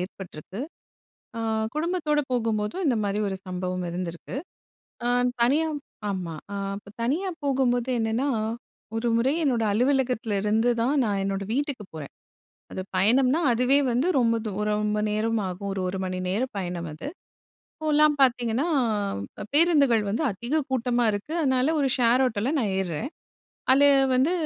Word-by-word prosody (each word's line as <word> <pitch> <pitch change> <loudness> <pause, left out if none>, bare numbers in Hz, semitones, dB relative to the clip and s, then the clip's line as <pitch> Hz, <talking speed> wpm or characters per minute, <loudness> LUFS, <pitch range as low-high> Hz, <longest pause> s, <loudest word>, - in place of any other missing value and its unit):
ஏற்பட்ருக்கு. 185 +1 -7 0.8
ஆ - - -2 0.3
குடும்பத்தோடு 310 -2 0
போகும்போதும், 225 - -1
இந்த 255 -5 +3
மாரி 200 0 -1
ஒரு 190 - -3
சம்பவம் 185 0 -3
இருந்திருக்கு. 175 +4 -5 0.7
ஆ - - +2 0.3
தனியா 285 +7 +3 0.4
ஆமா. 180 -4 -3 0.2
ஆ - - -3 0.2
இப்ப 205 - -13
தனியா 310 +12 0
போகும்போது 260 -3 +1
என்னனா, 225 +5 0 0.7
ஒரு 225 +2 -1
முறை 250 +4 +2
என்னோட 245 -6 +2
அலுவலகத்துல 250 -2 +1
இருந்து 220 +3 +2
தான் 260 +5 +2
நான் 200 -3 0
என்னோட 195 0 -2
வீட்டுக்குப் 270 -7 -3
போறன். 150 -3 -8 0.6
அது - - -4
பயணம்னா, 250 - +4
அதுவே 250 +4 +3
வந்து 250 +7 +1
ரொம்ப 230 -2 +3
தூர 210 +1 -2
ரொம்ப 210 0 0
நேரம் 220 +2 0
ஆகும். 185 +2 -5
ஒரு 195 - -3
1 185 +1 -3
மணி 185 0 -3
நேரம் 235 +8 -1
பயணம் 175 -3 -3
அது. 155 - -7 0.7
இப்போலாம் 305 -1 +3
பார்த்தீங்கன்னா, 245 +2 +2 0.7
அ - - -3
பேருந்துகள் 285 -8 +4
வந்து 225 +10 0
அதிக 240 +11 -1
கூட்டமா 245 -1 +1
இருக்கு. 205 +10 -4
அதனால 260 +1 +2
ஒரு 280 - +2
ஷேர் 245 +1 +4
ஆட்டோல 230 +1 0
நான் 215 -6 0
ஏர்றன். 190 - -3 0.6
அதுல 270 +2 +5 0.3
வந்து 265 +6 +3
235 Hz, 140 wpm, -26 LUFS, 200-270 Hz, 0.8 s, அதுல